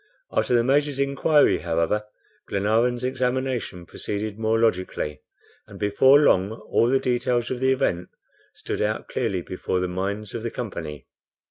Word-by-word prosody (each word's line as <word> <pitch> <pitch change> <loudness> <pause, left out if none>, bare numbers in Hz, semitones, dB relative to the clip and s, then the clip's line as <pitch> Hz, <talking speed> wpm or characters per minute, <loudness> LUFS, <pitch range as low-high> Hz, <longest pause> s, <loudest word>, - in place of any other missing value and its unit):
After 125 - +1
the 120 - +4
Major's 140 +2 +2
inquiry, 140 +2 +3
however, 85 +5 0 0.4
Glenarvan's 115 +5 +1
examination 130 -7 -2
proceeded 105 +4 -5
more 110 0 +1
logically, 95 -8 -1 0.5
and - - -11
before 130 +8 +5
long 100 -8 +3
all 115 0 0
the 135 +1 +3
details 120 -1 0
of 125 - -2
the 130 +1 +2
event 90 -9 0 0.5
stood - - -4
out 105 +1 -1
clearly 100 -8 -1
before 90 +1 -2
the 90 - -1
minds 100 +3 -4
of 115 - -4
the 115 - -3
company. 80 - -6
115 Hz, 145 wpm, -24 LUFS, 95-130 Hz, 0.5 s, before